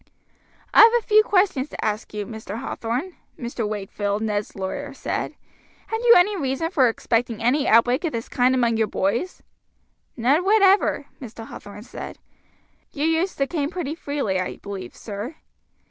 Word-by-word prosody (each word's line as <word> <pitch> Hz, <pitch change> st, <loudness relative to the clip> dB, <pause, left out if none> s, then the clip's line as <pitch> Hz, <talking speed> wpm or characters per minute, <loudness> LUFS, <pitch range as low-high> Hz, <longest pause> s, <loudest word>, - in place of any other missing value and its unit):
"I -, -, +6 dB
have 455 Hz, +1 st, +9 dB
a 470 Hz, -, -4 dB
few 430 Hz, 0 st, +6 dB
questions 365 Hz, -10 st, +1 dB
to -, -, -5 dB
ask 215 Hz, 0 st, -2 dB
you, 210 Hz, -1 st, -4 dB
Mr. 220 Hz, -1 st, -7 dB
Hathorn," 250 Hz, +14 st, -4 dB, 0.2 s
Mr. 235 Hz, -3 st, -3 dB
Wakefield, 205 Hz, 0 st, -3 dB
Ned's 210 Hz, -1 st, -2 dB
lawyer, 275 Hz, +9 st, -5 dB
said. -, -, -3 dB, 0.5 s
"Had 445 Hz, -, -2 dB
you 475 Hz, -1 st, +7 dB
any 400 Hz, +4 st, +4 dB
reason 295 Hz, 0 st, -2 dB
for 260 Hz, -9 st, +4 dB
expecting 230 Hz, 0 st, -1 dB
any 275 Hz, +5 st, +2 dB
outbreak 245 Hz, +5 st, +4 dB
of 325 Hz, -, -1 dB
this 230 Hz, -2 st, -4 dB
kind 255 Hz, +1 st, +2 dB
among 235 Hz, -3 st, +2 dB
your 220 Hz, -1 st, +2 dB
boys?" 225 Hz, -, -2 dB, 0.7 s
"None 270 Hz, +9 st, +3 dB
whatever," 395 Hz, -6 st, +4 dB, 0.2 s
Mr. 230 Hz, -2 st, -8 dB
Hathorn 205 Hz, +1 st, -10 dB
said. -, -, -8 dB, 0.7 s
"You 290 Hz, +1 st, -2 dB
use 325 Hz, +4 st, +1 dB
the 275 Hz, -, +1 dB
cane 290 Hz, -1 st, -2 dB
pretty 345 Hz, -5 st, -4 dB
freely, 285 Hz, -, -2 dB
I 185 Hz, -, -3 dB
believe, 200 Hz, -2 st, -8 dB
sir." 215 Hz, +7 st, -6 dB
255 Hz, 160 wpm, -23 LUFS, 220-325 Hz, 0.7 s, have